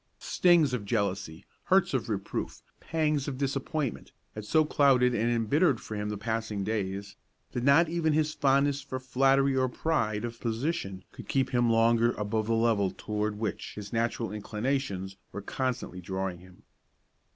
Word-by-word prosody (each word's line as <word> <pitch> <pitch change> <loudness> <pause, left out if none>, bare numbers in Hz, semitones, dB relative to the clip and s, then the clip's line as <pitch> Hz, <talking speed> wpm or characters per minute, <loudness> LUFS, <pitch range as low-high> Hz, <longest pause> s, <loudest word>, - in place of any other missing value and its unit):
Stings 170 -7 +3
of 120 -5 -2
jealousy, 100 -6 -2 0.2
hurts - - +3
of - - -1
reproof, - - -4 0.2
pangs 155 -3 0
of 135 -3 -3
disappointment, 140 0 -2 0.2
had 105 -1 -7
so 155 +7 +3
clouded 130 -4 +4
and 115 0 +1
embittered 125 - +2
for - - -8
him 105 0 -3
the 105 - -3
passing 110 -1 -2
days, 100 -1 -3 0.3
that 120 - -3
not 140 +5 +5
even 160 -1 +1
his 155 0 +1
fondness 140 0 +2
for 135 -1 -5
flattery 135 +1 +3
or 130 -1 +2
pride 120 -7 -1
of 115 0 -7
position 115 - -2
could - - -11
keep 135 -1 0
him 120 -1 +2
longer 115 +1 +4
above 110 +1 -2
the 115 - +2
level 115 -4 +2
toward 105 +2 -3
which 110 0 -4
his 105 0 -8
natural 115 0 -1
inclinations 105 -3 -3
were - - -5
constantly 125 -8 -3
drawing 95 0 -3
him. 90 0 -17
115 Hz, 160 wpm, -29 LUFS, 105-135 Hz, 0.3 s, not